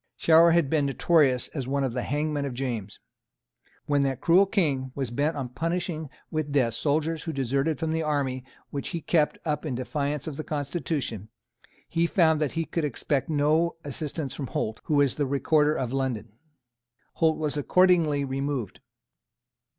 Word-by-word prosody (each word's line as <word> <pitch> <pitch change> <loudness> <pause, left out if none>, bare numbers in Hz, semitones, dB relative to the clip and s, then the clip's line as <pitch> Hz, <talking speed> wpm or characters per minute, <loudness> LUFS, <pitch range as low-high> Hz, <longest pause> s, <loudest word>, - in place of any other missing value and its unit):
Shower 165 +1 +6
had 170 -3 +3
been 145 -1 +1
notorious 135 -2 +3
as 135 -5 -5
one 140 +1 0
of 130 -3 -1
the 125 - -1
hangmen 150 +2 -1
of 135 -3 -4
James. 120 -6 -4 0.9
When 145 -1 +2
that 135 -2 0
cruel 185 +6 +5
King 140 -11 0
was 135 -4 -3
bent 145 +6 0
on 130 -3 -3
punishing 165 +2 -3 0.2
with 155 -2 -2
death 125 -5 +2
soldiers 155 +5 0
who 165 - -4
deserted 135 +2 0
from 160 +2 -2
the 160 0 0
army 140 -4 -1 0.3
which 140 - -4
he - - -6
kept 150 -1 +1
up 150 -2 -1
in 145 -6 -3
defiance 140 +3 -2
of 150 -3 -5
the 155 - -4
constitution, 145 - -3 0.6
he 170 0 +1
found 160 -4 +3
that 150 - 0
he 165 0 -1
could 165 - -2
expect 145 0 -1
no 155 +3 +2
assistance 145 0 -4
from 140 - -5
Holt, 110 -1 -3
who 150 - 0
was 145 -3 +3
the 145 -2 0
Recorder 150 +2 +2
of 125 -1 -2
London. 125 -5 -2 0.8
Holt 160 -1 +2
was 150 -2 -1
accordingly 160 -2 +3
removed. 135 -4 -3
145 Hz, 170 wpm, -26 LUFS, 135-160 Hz, 0.9 s, Shower